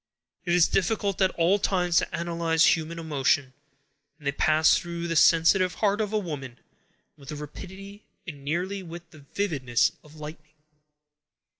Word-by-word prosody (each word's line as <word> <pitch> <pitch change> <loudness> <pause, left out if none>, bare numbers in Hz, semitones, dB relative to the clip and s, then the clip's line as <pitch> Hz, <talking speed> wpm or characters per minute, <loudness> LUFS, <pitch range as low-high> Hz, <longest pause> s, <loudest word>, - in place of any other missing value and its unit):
It 175 -1 +2
is 175 -2 +5
difficult 200 0 0
at 190 - +4
all 175 +4 +3
times 180 -3 +1
to - - -4
analyze 170 -1 +2
human 165 +1 -6
emotions, 145 -4 0 0.6
and 150 - -18
they 140 - +1
pass 155 +2 +3
through 170 -1 -4
the 165 - -2
sensitive 170 +3 +4
heart 205 0 +1
of 210 -1 -2
a 215 - +1
woman 145 - -5 0.6
with 140 -2 -14
the 150 - -5
rapidity 190 +7 -10 0.2
and 145 -5 -9
nearly 180 +7 -2
with 170 -1 -10
the 155 - -15 0.2
vividness 135 - +1
of 150 0 -17
lightning. 155 0 -10
170 Hz, 155 wpm, -26 LUFS, 150-185 Hz, 0.6 s, is